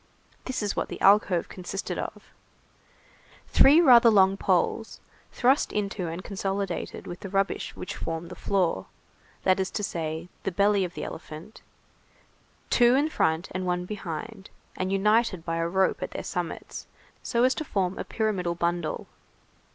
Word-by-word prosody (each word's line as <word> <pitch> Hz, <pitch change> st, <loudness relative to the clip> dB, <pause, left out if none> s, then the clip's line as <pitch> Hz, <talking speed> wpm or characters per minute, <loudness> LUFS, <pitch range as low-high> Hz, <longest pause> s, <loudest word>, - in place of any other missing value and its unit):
This 260 Hz, -4 st, -3 dB
is 205 Hz, -, -1 dB
what -, -, -1 dB
the -, -, -6 dB
alcove 195 Hz, -3 st, +4 dB
consisted 190 Hz, +2 st, -5 dB
of:— -, -, -6 dB, 1.3 s
Three 285 Hz, +4 st, +7 dB
rather 245 Hz, -7 st, +7 dB
long 195 Hz, -3 st, +5 dB
poles, 195 Hz, +4 st, 0 dB, 0.3 s
thrust 265 Hz, +3 st, +2 dB
into 200 Hz, -3 st, -2 dB
and 170 Hz, +3 st, -5 dB
consolidated, 195 Hz, -2 st, -3 dB
with 175 Hz, -, -7 dB
the 195 Hz, -1 st, -7 dB
rubbish 195 Hz, +1 st, -1 dB
which 180 Hz, -, -6 dB
formed 165 Hz, +1 st, -5 dB
the -, -, -7 dB
floor, 180 Hz, -, 0 dB, 0.6 s
that 185 Hz, 0 st, +3 dB
is 190 Hz, -, 0 dB
to 210 Hz, -, -4 dB
say, 160 Hz, -3 st, -3 dB
the 195 Hz, -, -2 dB
belly 200 Hz, +2 st, +3 dB
of 175 Hz, -1 st, -5 dB
the -, -, -5 dB
elephant, 160 Hz, +6 st, -9 dB, 1.1 s
two 240 Hz, 0 st, +5 dB
in 290 Hz, +3 st, +2 dB
front 160 Hz, -, 0 dB
and 185 Hz, 0 st, -3 dB
one 180 Hz, 0 st, -1 dB
behind, 195 Hz, +1 st, -6 dB, 0.3 s
and 185 Hz, +1 st, -2 dB
united 200 Hz, -2 st, +2 dB
by 165 Hz, 0 st, -2 dB
a 165 Hz, 0 st, 0 dB
rope 190 Hz, +2 st, +1 dB
at -, -, -3 dB
their -, -, -6 dB
summits, -, -, -5 dB, 0.3 s
so 235 Hz, -1 st, 0 dB
as 260 Hz, +1 st, +4 dB
to 310 Hz, -, -4 dB
form 195 Hz, -9 st, -1 dB
a -, -, -2 dB
pyramidal 195 Hz, -6 st, -1 dB
bundle. 170 Hz, -1 st, -2 dB
190 Hz, 160 wpm, -27 LUFS, 175-210 Hz, 1.3 s, Three